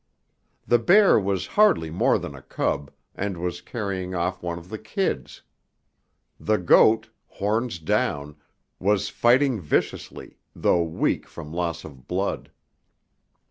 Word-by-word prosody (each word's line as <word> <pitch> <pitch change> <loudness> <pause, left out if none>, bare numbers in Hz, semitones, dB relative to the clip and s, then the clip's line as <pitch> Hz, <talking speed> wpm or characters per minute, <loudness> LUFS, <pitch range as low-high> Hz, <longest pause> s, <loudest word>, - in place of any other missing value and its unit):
The 120 - +4
bear 195 - +5
was 95 -2 -1
hardly 200 - +4
more 85 - +2
than - - -6
a 65 - -11
cub, 70 +1 -2 0.2
and 100 -2 -3
was 90 +1 -4
carrying 95 -3 -4
off 85 +1 -2
one 85 -1 -4
of 85 +1 -12
the 110 - -6
kids. 195 -2 -3 1.0
The 110 0 +1
goat, 110 +4 +4 0.2
horns 110 +2 -2
down, 75 -2 -1 0.4
was 100 +1 +1
fighting 125 -1 +3
viciously, 75 - -3 0.2
though 85 - +2
weak 80 -1 -1
from 80 -2 -10
loss 85 -1 -2
of 65 -4 -13
blood. 95 +2 -2
95 Hz, 130 wpm, -24 LUFS, 85-110 Hz, 1.0 s, bear